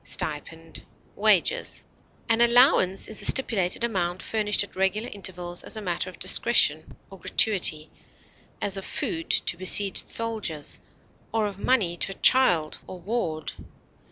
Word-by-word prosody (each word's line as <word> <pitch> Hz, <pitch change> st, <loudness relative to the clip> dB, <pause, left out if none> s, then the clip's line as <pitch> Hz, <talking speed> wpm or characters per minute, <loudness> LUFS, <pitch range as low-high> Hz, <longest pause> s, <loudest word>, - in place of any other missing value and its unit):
fee, -, -, -3 dB, 0.8 s
An 230 Hz, -1 st, +1 dB
allowance 235 Hz, -6 st, +3 dB
is 220 Hz, -, -1 dB
a -, -, -1 dB
stipulated 215 Hz, -6 st, +2 dB
amount 185 Hz, -5 st, -3 dB
furnished 210 Hz, -2 st, +1 dB
at 200 Hz, -, -14 dB
regular 195 Hz, +4 st, -1 dB
intervals 180 Hz, -3 st, -5 dB
as -, -, -8 dB
a -, -, -6 dB
matter 180 Hz, 0 st, -4 dB
of 185 Hz, -, -14 dB
discretion 170 Hz, -5 st, +2 dB
or 195 Hz, -, -13 dB
gratuity, 170 Hz, -5 st, +2 dB, 0.7 s
as 200 Hz, -1 st, -1 dB
of 195 Hz, -, -6 dB
food 165 Hz, -3 st, -5 dB
to 170 Hz, -, 0 dB
besieged 190 Hz, +2 st, +3 dB
soldiers, 215 Hz, -10 st, -2 dB, 0.5 s
or 220 Hz, -1 st, -1 dB
of 200 Hz, -2 st, -7 dB
money 200 Hz, -8 st, 0 dB
to 195 Hz, -, -2 dB
a -, -, -22 dB
child 175 Hz, -14 st, +3 dB
or 185 Hz, -, -10 dB
ward. 175 Hz, -6 st, -4 dB
195 Hz, 135 wpm, -24 LUFS, 175-220 Hz, 0.8 s, allowance